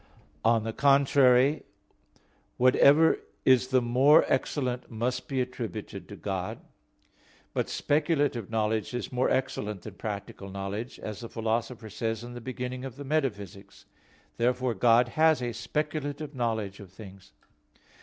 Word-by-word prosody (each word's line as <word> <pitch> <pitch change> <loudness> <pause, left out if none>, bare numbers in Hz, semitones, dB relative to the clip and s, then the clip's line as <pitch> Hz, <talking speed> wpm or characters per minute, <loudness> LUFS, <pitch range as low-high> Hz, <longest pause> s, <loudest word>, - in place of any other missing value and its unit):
On 115 -1 +3
the 110 0 -3
contrary, 140 0 +4 1.0
Whatever 140 +5 +5 0.3
is 130 -1 +5
the 130 -1 +2
more 135 +6 +5
excellent 130 -2 -1
must 120 +2 -3
be 135 -2 -2
attributed 120 -4 -5
to - - -8
God. - - -4 1.0
But - - -1
speculative 145 - 0
knowledge 110 +1 -1
is 125 - -4
more 125 0 +1
excellent 105 -7 -2
than 110 - -8
practical 100 -1 -6
knowledge, 100 +5 -5
as 105 -2 -7
the 115 - -8
Philosopher 115 0 -3
says 115 +1 -3
in 120 0 -8
the 120 - -8
beginning 125 +1 -5
of 130 -1 -7
Metaphysics. 130 - -3 0.5
Therefore 125 +1 +1
God 115 +3 +4
has 155 +3 +3
a 120 -1 -3
speculative 150 +3 -3
knowledge 110 -6 -2
of 100 -4 -12
things. 95 -1 -13
120 Hz, 130 wpm, -28 LUFS, 110-135 Hz, 1.0 s, Whatever